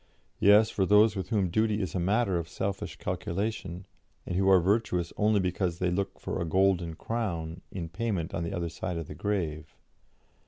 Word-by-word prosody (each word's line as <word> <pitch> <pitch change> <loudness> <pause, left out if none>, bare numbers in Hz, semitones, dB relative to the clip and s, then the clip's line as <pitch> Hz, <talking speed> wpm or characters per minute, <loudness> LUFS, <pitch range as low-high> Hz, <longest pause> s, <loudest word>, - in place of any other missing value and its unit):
Yes, 105 +2 +6
for 95 - 0
those 105 +1 +5
with 95 -2 -4
whom 100 -6 +1
duty 110 +1 +1
is 95 -6 -3
a 95 - -1
matter 95 0 +1
of 85 0 -6
selfish 100 0 -3
calculation, 95 -1 -3 0.4
and 90 - -3
who 95 +1 +3
are 95 -1 +7
virtuous 90 -2 0
only 105 0 +3
because 90 -2 -1
they 90 -1 0
look 100 +2 -2
for 95 - -3
a - - +1
'golden 90 -1 +2
crown' 90 -7 -3
in 90 -4 -4
payment 95 -1 -3
on 90 -3 -2
the 85 - -3
other 85 -3 -2
side 85 +1 -4
the - - -8
grave. 80 -4 -3
95 Hz, 185 wpm, -29 LUFS, 85-105 Hz, 0.4 s, are